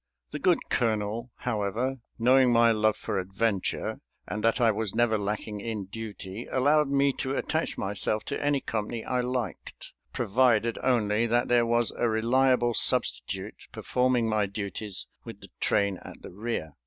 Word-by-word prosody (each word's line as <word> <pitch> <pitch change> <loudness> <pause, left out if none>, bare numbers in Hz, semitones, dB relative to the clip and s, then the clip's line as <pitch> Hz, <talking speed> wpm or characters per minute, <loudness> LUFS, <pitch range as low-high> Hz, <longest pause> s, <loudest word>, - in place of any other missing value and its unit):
The - - -4
good - - +2
colonel, 110 +1 0
however, 120 +3 -2 0.2
knowing 125 +2 +5
my 115 0 +5
love 110 -1 +2
for 95 - -2
adventure, 95 +1 -1 0.3
and 105 - -4
that 115 +4 +2
I 115 -2 +4
was 105 -1 -3
never 120 -2 +3
lacking 105 0 -3
in 110 -3 -4
duty, 105 0 -7
allowed 145 +3 +3
me 140 0 +3
to 135 0 -1
attach 160 +1 -1
myself 105 +2 0
to 140 - -4
any 145 -1 +1
company 110 +1 -3
I 125 0 0
liked, 125 -1 -5 0.2
provided 115 0 +2
only, 115 -3 +2
that 120 +2 +1
there 120 -1 +4
was 120 0 +1
a 120 - +1
reliable 120 +2 +2
substitute - - 0
performing 125 -2 +1
my 110 -2 +1
duties 100 -1 -4 0.2
with - - -9
the - - -12
train 100 -2 +1
at - - -12
the - - -9
rear. 100 -5 -4
115 Hz, 155 wpm, -27 LUFS, 105-125 Hz, 0.3 s, knowing